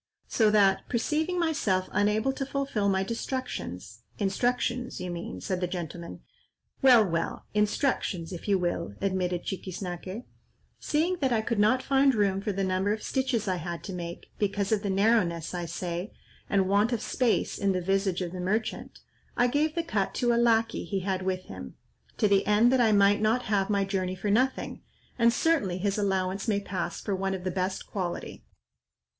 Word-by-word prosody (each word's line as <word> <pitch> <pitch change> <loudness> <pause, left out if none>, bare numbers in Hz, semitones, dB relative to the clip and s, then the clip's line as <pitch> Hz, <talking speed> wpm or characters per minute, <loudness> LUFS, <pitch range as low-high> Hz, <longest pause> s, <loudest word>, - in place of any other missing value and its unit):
So 220 -2 +3
that, 200 -2 +3
perceiving 315 +9 0
myself 260 - +1
unable 210 +6 +2
to 270 - -3
fulfil 270 -7 -1
my 190 0 +2
destructions"—"Instructions 235 - -3
you 180 0 -4
mean," 170 - -6
said 185 - -2
the 180 - +1
gentleman;—"Well, 180 - 0
well, 165 -2 -2
instructions 210 - 0
if 175 - -8
you 200 -1 +4
will," 175 - -2
admitted 185 -2 -1
Chiquiznaque,—"seeing 195 - -4
that 270 -5 0
I 225 -2 +2
could 225 -1 -1
not 255 +5 +3
find 275 -1 +3
room 195 -2 +1
for 210 - -1
the 195 0 -1
number 190 +2 +1
of 215 0 -2
stitches 260 -5 -1
I 185 -1 0
had 170 0 -5
to 195 - -6
make, 170 -1 -7
because 200 0 0
of 215 -2 +2
the 205 - -2
narrowness, 190 -5 +2
I 175 -1 -3
say, 175 +3 -4 0.4
and 195 -2 +2
want 205 +4 +3
of 235 - -1
space 245 -3 0
in 200 -1 +2
the 185 - 0
visage 195 0 0
of 175 - -4
the 185 - -6
merchant, 215 +5 -2 0.4
I 245 - +4
gave 300 +5 +1
the 335 - 0
cut 205 -12 -1
to 240 -1 +2
a - - +2
lacquey 230 -1 +2
he 195 -2 -2
had 190 0 -1
with 185 0 -2
him, - - -9 0.4
to 215 - +3
the 200 -1 +3
end 215 +4 +5
that 260 -1 +4
I 225 -2 +4
might 200 0 +4
not 225 +3 +2
have 200 -1 0
my 200 -1 +2
journey 185 -1 -2
for 200 +2 -2
nothing; 255 +5 0 0.4
and 235 0 +5
certainly 235 - +1
his 200 +2 -1
allowance 190 0 0
may 205 -2 +2
pass 195 -2 -4
for 200 - -2
one 195 0 -1
of 180 - -7
the 185 - -1
best 185 +1 -2
quality." 180 -4 -5
200 Hz, 180 wpm, -28 LUFS, 185-235 Hz, 0.4 s, end